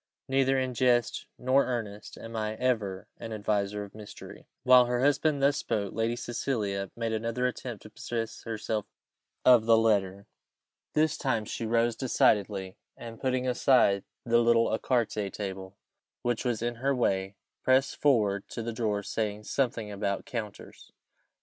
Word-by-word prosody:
Neither 135 0 +2
in 130 -1 -1
jest 120 -1 +1
nor 130 +2 +3
earnest 110 -5 -5
am 115 0 -9
I 110 0 -2
ever 110 -6 -1
an 115 - -7
adviser 105 -1 -1
of 100 - -11
mystery." 105 -1 -11 0.2
While 125 -1 +7
her 120 0 0
husband 145 +1 +2
thus 140 +1 +4
spoke, 100 -9 -2
Lady 115 +2 0
Cecilia 105 -6 -2
made 115 -1 -2
another 115 +3 -1
attempt 125 -3 -4
to 110 - -12
possess 115 0 -4
herself 110 -2 -3 0.6
of 120 -3 +7
the 115 -1 +6
letter. 100 -3 +1 0.7
This 155 0 +2
time 115 -6 0
she 115 +2 -4
rose 115 0 +2
decidedly, 100 -6 +1 0.2
and, 115 -1 -9
putting 130 -1 0
aside 125 -6 +3 0.2
the 120 0 +4
little 115 -1 +3
ecarté 110 -5 -1
table 95 -1 -6 0.5
which 120 -2 0
was 115 -2 -1
in 120 0 -2
her 135 +1 +2
way, 95 -5 0 0.3
pressed 130 +1 +3
forward 105 -8 +2
to 115 - -5
the 115 0 -4
drawer, 105 -3 -1
saying 105 0 -3
something 115 -4 -1
about 100 -1 -2
"counters." 115 -7 -7
115 Hz, 150 wpm, -29 LUFS, 105-125 Hz, 0.7 s, While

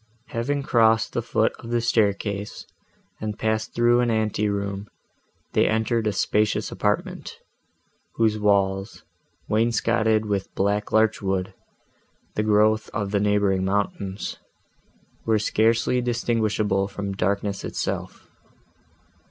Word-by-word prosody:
Having 140 +5 -1
crossed 110 -3 +3
the - - 0
foot - - +1
of 115 - -9
the 120 0 +1
staircase, 105 -3 0 0.5
and 105 0 -4
passed 110 0 -1
through 120 0 +4
an 120 -1 +2
ante 110 -2 0
room, 100 0 -3 0.7
they - - +3
entered 110 0 0
a - - +2
spacious 105 +2 0
apartment, - - -2 0.8
whose 110 -2 +2
walls, 100 -1 +1 0.4
wainscoted 110 0 +2
with 100 -2 -2
black 100 +2 0
larch 110 0 +3
wood, 95 -1 -1 0.8
the - - 0
growth 110 +1 +3
of 100 -2 -2
the 105 - +2
neighbouring 100 -2 +2
mountains, 100 0 -2 0.9
were 110 -1 +4
scarcely 115 +4 +2
distinguishable 110 -4 0
from 100 0 -5
darkness 100 +1 -1
itself. - - -4
105 Hz, 115 wpm, -24 LUFS, 100-110 Hz, 0.9 s, through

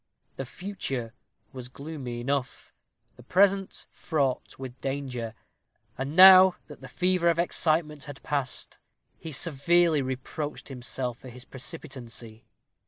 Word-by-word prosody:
The 135 - -5
future 135 - -5 0.4
was 125 -2 -7
gloomy 135 -4 -6
enough 135 0 -3 0.4
the - - -13
present 195 +7 +2
fraught 140 -5 -2
with 130 -1 -8
danger. 130 -5 -4 0.6
And 135 +4 -4
now 185 0 +10
that - - -13
the - - -9
fever 180 -1 +2
of 170 - +2
excitement 155 -3 0
was 145 -1 -7
passed, 140 -3 -3 0.4
he 160 - -7
severely 165 +2 +2
reproached 130 +4 -5
himself 125 -1 -4
for 130 - -11
his 125 +1 -12
precipitancy. 125 -6 -8
140 Hz, 120 wpm, -27 LUFS, 125-165 Hz, 0.6 s, now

